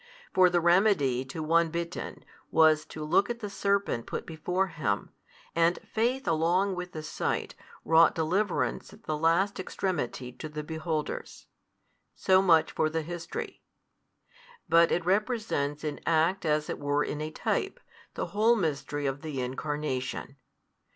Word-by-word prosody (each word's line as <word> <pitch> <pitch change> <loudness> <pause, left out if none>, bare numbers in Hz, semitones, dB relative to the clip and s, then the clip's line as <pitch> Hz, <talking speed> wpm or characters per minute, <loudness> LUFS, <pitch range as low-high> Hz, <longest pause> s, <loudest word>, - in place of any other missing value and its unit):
For 185 -1 +6
the 175 0 +2
remedy 170 - +3
to 155 +4 -5
one 165 +1 +3
bitten, 170 +2 -5 0.2
was 155 -1 +4
to 155 - -7
look 195 +7 +3
at 240 - -2
the 210 -4 -6
serpent 200 -13 0
put - - -4
before 180 +4 -1
him, 155 - -2 0.4
and 170 +1 +3
faith 245 +4 -1
along 175 +5 +2
with 180 0 -6
the 155 - -6
sight - - -2 0.3
wrought 165 +1 +5
deliverance 180 +5 0
at - - -17
the 155 - -2
last 170 +6 +2
extremity 150 -10 -3
to 155 +5 -8
the 150 0 -5
beholders. 160 0 -4 0.7
So 190 0 +4
much 165 -4 +4
for 155 - +1
the 160 0 -2
history. 170 +1 -6 1.1
But 165 0 +5
it 175 - 0
represents 190 - 0
in 150 -2 -3
act 165 +3 +2
as 150 0 +1
it - - -4
were 145 +1 +1
in 150 - -4
a 155 - -3
type, - - -2 0.4
the - - -2
whole 220 +3 +4
Mystery 145 -6 -2
of 135 +1 -2
the 155 -4 -4
Incarnation. 135 0 -3
165 Hz, 150 wpm, -28 LUFS, 150-185 Hz, 1.1 s, For